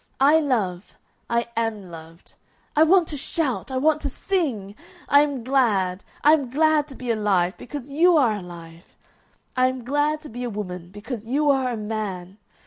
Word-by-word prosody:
I 290 +4 +6
love. 210 - -2 0.3
I 235 0 0
am 220 -5 -2
loved. 165 +1 -13 0.4
I 300 - +4
want 340 +1 +5
to 295 - -4
shout! 280 -2 -2
I 260 - -2
want 305 +3 +2
to 280 - -2
sing! 265 - -2 0.3
I 285 - +6
am 285 -5 -1
glad! 205 -8 +1 0.2
I 300 - +7
am 285 -6 +1
glad 305 +2 +2
to 270 - -11
be 250 -2 -3
alive 200 -4 +1
because 280 0 -8
you 335 +4 +4
are 245 -7 +3
alive! 170 -3 -11 0.6
I 255 0 +4
am 255 -1 -4
glad 290 +4 0
to 305 - -10
be 245 +2 -6
a 245 - -2
woman 180 -5 -6
because 220 +3 -7
you 290 +4 +2
are 265 -2 +1
a 235 - -3
man! 210 -3 -5
245 Hz, 180 wpm, -23 LUFS, 200-290 Hz, 0.6 s, I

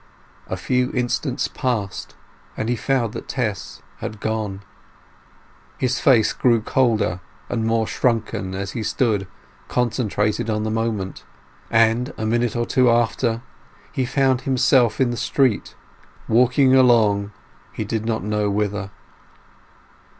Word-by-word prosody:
A - - -3
few 125 0 0
instants 125 -1 -1
passed, 110 -7 -3 0.4
and 110 - -2
he 125 - +2
found 120 -2 0
that - - -7
Tess 105 -7 -4 0.2
was 110 - -4
gone. 105 -2 -3 1.1
His 130 -1 0
face 120 -7 +4
grew 120 -2 +3
colder 110 -5 +1 0.3
and 115 -2 -1
more 115 0 +1
shrunken 110 -6 -1
as 100 +1 -4
he 120 - -4
stood 105 -3 0 0.4
concentrated 110 -3 0
on 105 -1 0
the 110 - -2
moment, 110 -4 -2 0.5
and 115 +4 +2
a 110 - -3
minute 120 +1 0
or 120 0 0
two 125 0 +3
after, 115 0 +1 0.5
he 130 - -1
found 130 0 +1
himself 130 -3 +3
in 130 -2 +2
the 120 - -4
street, 130 -3 0 0.5
walking 125 +3 +4
along 110 -6 +4 0.4
he - - -4
did 110 +1 -2
not 110 -2 -2
know 105 0 0
whither. 100 -1 -1
115 Hz, 130 wpm, -22 LUFS, 105-125 Hz, 1.1 s, face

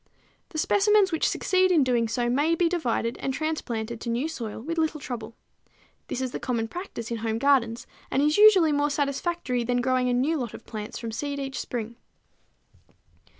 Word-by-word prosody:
The 315 - -7
specimens 410 +3 +3
which 320 - +1
succeed 370 0 +2
in 320 -5 +5
doing 240 -3 +1
so 240 +2 -1
may 290 +7 +2
be 345 0 +2
divided 245 -9 -1
and 270 - -2
transplanted 235 -7 -3
to 235 - -4
new 240 +6 0
soil 235 -11 -5
with 330 +8 -3
little 315 -1 0
trouble. 230 -4 -6 0.7
This 260 - -3
is 260 -1 -2
the - - -4
common 230 -3 -1
practice 345 - -6
in 230 - -1
home 225 0 -2
gardens, 235 -3 +2 0.2
and - - 0
is 300 +1 +3
usually 390 -7 +7
more 290 0 +2
satisfactory 285 -2 -1
than 245 +1 0
growing 255 0 +1
a - - +1
new 280 +7 +1
lot 245 -5 -4
of - - -12
plants 215 -1 -6
from 230 -1 -5
seed 285 +5 -3
each 270 -1 -4
spring. 235 -1 -5
260 Hz, 190 wpm, -26 LUFS, 235-315 Hz, 0.7 s, usually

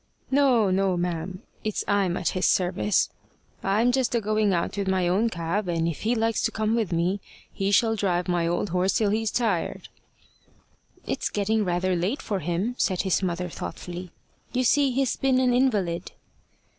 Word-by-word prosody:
"No, 255 -7 +4
no, 190 -1 +1
ma'am; 175 +1 -3 0.2
it's 215 -1 -2
I'm 195 -4 +1
at - - 0
his 185 - 0
service. 185 +2 +1 0.5
I'm 215 +5 +2
just 250 -2 +1
a - - +3
going 215 -1 +1
out 170 0 -1
with 200 -1 -2
my 185 -2 +1
own 200 +6 +2
cab, 175 +2 -2
and 165 -1 0
if 165 - -4
he 230 +3 +1
likes 225 0 +1
to - - 0
come 215 0 0
with 225 -5 0
me, 175 +4 0 0.3
he 195 0 -1
shall 225 +2 +3
drive 180 -4 0
my 175 -2 +1
old 175 +4 -1
horse 185 +2 +1
till 210 -3 +2
he's 220 +1 0
tired." 210 -9 -1 1.2
"It's - - -2
getting 210 +1 0
rather 180 0 0
late 185 +11 -1
for 200 -3 -2
him," 180 +8 -1
said 185 -3 +1
his 190 -1 +1
mother 180 -1 -2
thoughtfully. 175 +1 -7 0.4
"You 255 0 +1
see 280 +3 +4
he's 260 0 0
been 265 -1 +2
an 250 -1 +3
invalid." 205 -10 +1
195 Hz, 180 wpm, -25 LUFS, 180-225 Hz, 1.2 s, No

